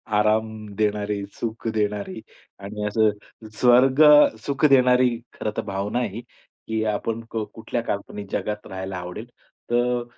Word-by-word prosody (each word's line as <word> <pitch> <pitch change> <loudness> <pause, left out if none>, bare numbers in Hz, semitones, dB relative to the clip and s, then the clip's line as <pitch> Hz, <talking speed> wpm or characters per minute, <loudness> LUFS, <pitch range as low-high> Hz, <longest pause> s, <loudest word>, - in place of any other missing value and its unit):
आराम 110 +1 +2 0.3
देणारी, 105 -1 -1
सुख 115 0 -5
देणारी 105 -1 -2 0.4
आणि 105 +1 -5
असं 110 +1 -1
स्वर्गसुख 135 +1 +5
देणारी 125 -1 +5 0.2
खरं 105 - -3
तर - - +1
भावना 100 +3 -2
आहे 125 - 0
ही 110 +5 -7 0.5
की 110 0 -1
आपण 115 +2 -3
क 110 -1 -2
कुठल्या 115 +1 -3
काल्पनिक 100 -2 -5
जगात 105 0 -3
राहायला 95 0 -5
आवडेल. 90 +5 -7 0.4
तर 120 0 +1
110 Hz, 130 wpm, -23 LUFS, 105-120 Hz, 0.5 s, स्वर्गसुख